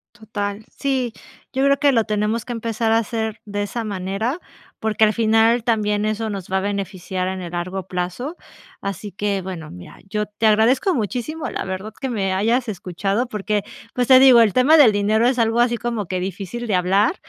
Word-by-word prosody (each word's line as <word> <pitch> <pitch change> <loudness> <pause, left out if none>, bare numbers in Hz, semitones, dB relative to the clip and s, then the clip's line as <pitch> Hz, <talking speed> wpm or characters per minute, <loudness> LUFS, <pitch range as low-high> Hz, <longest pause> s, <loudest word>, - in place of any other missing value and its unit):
Total. 210 -1 -5
Sí, 260 -4 -2 0.4
yo 265 +1 +1
creo 280 0 +4
que 285 0 +4
lo 230 -2 +3
tenemos 215 +2 -1
que - - -6
empezar 225 -1 -1
a 225 - +5
hacer 220 -1 -2
de 205 -1 -3
esa 225 +3 -4
manera, 200 - -2 0.4
porque 220 0 +1
al 215 - +2
final 225 +1 +3
también 210 -3 +1
eso 215 +1 -1
nos 195 -3 -6
va 190 - +2
a - - +2
beneficiar 190 -2 -3
en 190 0 -3
el 175 -2 -7
largo 180 +2 -3
plazo. 180 - -4 0.5
Así 200 +1 -5
que, 200 0 -1
bueno, 175 -4 -6
mira, 90 0 -12
yo 210 0 -1
te 210 +2 -1
agradezco 245 - +3
muchísimo, 250 +7 -3
la - - -3
verdad 190 +3 -5
que 265 - -3
me 195 -5 -1
hayas 230 +6 +1
escuchado 195 +3 -2
porque, 210 -2 -2 0.3
pues, 245 -1 0
te 260 - +8
digo, 260 -3 +8
el 215 -4 +3
tema 265 +5 +5
del 275 -8 +7
dinero 210 +3 +2
es 255 0 +1
algo 230 0 +2
así 240 0 +3
como 230 -4 -3
que 185 0 -2
difícil 195 +5 -5
de 210 - -1
hablar. 195 - +2
215 Hz, 200 wpm, -21 LUFS, 195-235 Hz, 0.5 s, te